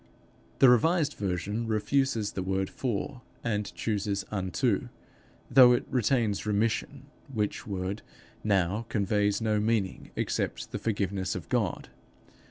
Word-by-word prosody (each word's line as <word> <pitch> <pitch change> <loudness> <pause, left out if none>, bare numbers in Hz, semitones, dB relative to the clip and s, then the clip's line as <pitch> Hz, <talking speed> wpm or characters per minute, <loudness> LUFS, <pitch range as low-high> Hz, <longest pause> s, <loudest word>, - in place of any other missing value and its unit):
_ - - -29
The 135 - +7
revised 150 +5 +4
version 100 +4 -2
refuses 110 0 +1
the 95 - -4
word 95 +1 -1
for 125 +1 -3 0.2
and 105 -3 -1
chooses 100 -2 -1
unto, 95 -4 0 0.6
though 125 -1 +8
it 120 - 0
retains 115 -4 +1
remission, 110 +6 -1 0.3
which 110 0 -2
word, 95 +1 -3 0.4
now, 100 +2 +1
conveys 105 0 +1
no 110 -1 +1
meaning 105 -3 -1
except - - -2
the - - -3
forgiveness 100 -3 -1
of - - -7
God. - - -1
105 Hz, 125 wpm, -29 LUFS, 100-115 Hz, 0.6 s, though